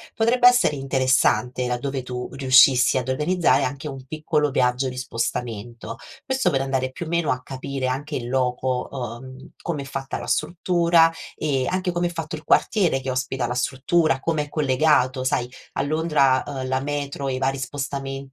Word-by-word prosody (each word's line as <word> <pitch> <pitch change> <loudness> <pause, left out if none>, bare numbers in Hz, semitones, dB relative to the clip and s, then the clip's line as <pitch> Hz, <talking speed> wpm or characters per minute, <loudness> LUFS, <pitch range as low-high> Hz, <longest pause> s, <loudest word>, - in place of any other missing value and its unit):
Potrebbe 240 +2 +4
essere 245 - +4
interessante, 130 -2 +1
laddove 130 +2 -3
tu 125 0 -5
riuscissi 130 -1 +5
ad 130 0 -2
organizzare, 165 +6 +2
anche 140 +3 -4
un 135 -2 -9
piccolo 150 0 0
viaggio 125 0 +1
di 125 - -6
spostamento. 120 -2 -4 0.3
Questo 265 0 +1
per 135 - +1
andare, 130 -1 -1
più 165 +5 -7
o - - -6
meno, 170 -2 +1
a 125 - -7
capire 135 0 -4
anche 145 +4 -3
in 120 -1 -4
loco, 125 0 0
uhm, 130 +1 -7
com'è 155 -5 -3
fatta 135 0 -5
la - - -7
struttura 170 0 +3 0.2
e 135 -4 -1
anche 185 0 -1
come 175 0 0
è - - -3
fatto 165 -2 -5
il 155 - -13
quartiere 175 -11 +2
che 130 0 -3
ospita 130 0 -2
la 125 +1 -3
struttura, 135 +3 +1
com'è 155 -3 -1
collegato. 130 -3 +2
Sai, 125 -1 0 0.2
a - - -1
Londra, 145 -3 +2
uhm, 130 -2 -4
la 130 0 +1
metro 140 0 -3
e 130 - -1
i - - -2
vari 135 +1 0
spostamenti 135 +1 -4
135 Hz, 175 wpm, -23 LUFS, 130-155 Hz, 0.3 s, riuscissi